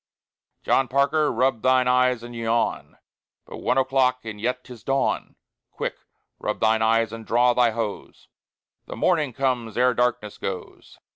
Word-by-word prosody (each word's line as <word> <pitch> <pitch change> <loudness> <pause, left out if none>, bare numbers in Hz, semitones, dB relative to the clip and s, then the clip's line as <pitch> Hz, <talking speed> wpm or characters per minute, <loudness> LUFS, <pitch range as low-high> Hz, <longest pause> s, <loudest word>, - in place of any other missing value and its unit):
John 135 - +2
Parker! 140 +4 +2
rub 125 -1 +1
thine 130 0 +3
eyes 125 -1 +2
and 120 0 -9
yawn, 115 0 -1 0.5
But - - -9
one 125 - 0
o'clock 130 -2 +1
and 105 -2 -7
yet 125 +2 -2
'tis 120 -4 -12
Dawn! 135 +2 -1 0.3
Quick, - - -4 0.4
rub - - -3
thine 110 0 +2
eyes 115 0 +2
and 115 0 -7
draw 120 +2 +3
thy 120 -1 +3
hose: 110 -2 -5 0.6
The - - -7
Morning 150 -4 +1
comes 125 -3 -2
ere 125 +1 +4
darkness 120 -4 -1
goes. 95 -2 -7
125 Hz, 150 wpm, -24 LUFS, 115-130 Hz, 0.6 s, ere